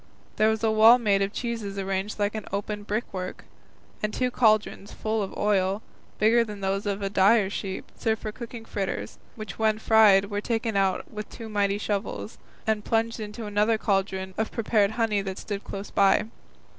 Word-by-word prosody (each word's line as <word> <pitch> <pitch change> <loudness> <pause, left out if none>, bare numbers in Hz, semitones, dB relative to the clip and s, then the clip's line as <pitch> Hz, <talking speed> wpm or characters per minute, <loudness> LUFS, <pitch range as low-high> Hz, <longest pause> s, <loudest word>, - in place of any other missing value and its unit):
There 215 +1 +4
was 220 0 -1
a 220 - +3
wall 220 +3 +8
made 205 -5 +2
of 195 0 0
cheeses 225 -4 -4
arranged 195 +1 -2
like 205 0 0 0.2
open 205 +1 -3
brick 210 +3 -2
work, 185 -1 -5 0.6
and 215 - -1
two 250 +2 -1
cauldrons 215 -4 +2
full 220 0 -2
of 195 - -5
oil, 200 0 +1 0.3
bigger 230 +2 +4
than 210 -3 -8
those 195 +1 -1
of 200 0 -2
a 195 - 0
dyer's 200 0 +4
shop, 190 -2 -5
served 220 -2 -1
for 215 - -3
cooking 230 0 -8
fritters, 185 - -4 0.2
which 215 -4 -8
when 220 -1 +2
fried 210 -3 +5
were 205 0 -1
taken 225 -1 -1
out 195 -1 0
with 210 -1 -6
two 225 -2 -9
mighty 200 -1 +1
shovels, 195 - -4 0.3
and 220 -1 0
plunged 230 +1 0
into 215 +1 -6
another 210 +2 +2
cauldron 190 -2 -1
of 220 - -1
prepared 215 -2 +1
honey 220 -3 +1
that 190 -1 -5
stood 200 -1 -5
close 195 +1 -7
by. 195 +1 +4
210 Hz, 180 wpm, -26 LUFS, 195-220 Hz, 0.6 s, wall